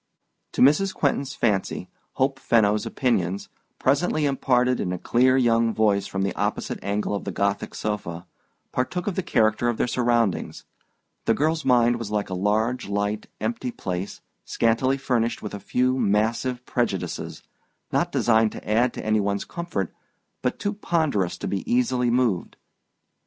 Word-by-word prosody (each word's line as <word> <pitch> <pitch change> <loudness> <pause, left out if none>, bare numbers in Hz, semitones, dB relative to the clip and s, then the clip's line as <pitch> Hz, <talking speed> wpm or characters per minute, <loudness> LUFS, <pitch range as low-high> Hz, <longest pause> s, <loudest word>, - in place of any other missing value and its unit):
To - - +3
Mrs. 150 +8 +4
Quentin's 140 -1 0
fancy, 105 -5 0 0.3
Hope 135 0 0
Fenno's 105 -4 +2
opinions, 100 -7 0 0.3
presently 150 +3 +1
imparted 125 -2 +2
in 90 - -1
a 90 - -2
clear 130 +7 +3
young 115 -2 +3
voice 100 -2 +2
from 95 0 -2
the 100 - -1
opposite - - -2
angle 105 +1 -1
of 100 - -2
the - - -4
Gothic 100 0 -1
sofa, 95 -5 -4 0.5
partook 170 +8 -2
of 205 - -1
the 190 - -1
character 110 - +2
of 120 - -1
their - - +2
surroundings. 120 -4 0 0.6
The 115 - +3
girl's 160 +2 +1
mind 120 -2 +4
was 115 -3 -5
like 105 -2 -2
a - - -1
large 105 +5 0
light 105 +1 -1
empty 115 +3 -2
place, 95 -4 -5 0.2
scantily 120 +4 +1
furnished 120 -4 -1
with 105 - -5
a 100 - -5
few 125 +5 +1
massive 115 +4 0
prejudices, 115 -7 -2 0.5
not - - +1
designed 110 -2 +3
to - - -10
add 115 +4 +2
to - - -6
any 110 0 +2
one's 100 0 -1
comfort 170 - -4 0.5
but 125 - -1
too 205 - -2
ponderous 155 - 0
to - - -4
be 95 - -1
easily 125 0 +2
moved. 120 -7 0
Mrs. - - -50
115 Hz, 160 wpm, -24 LUFS, 105-130 Hz, 0.6 s, Mrs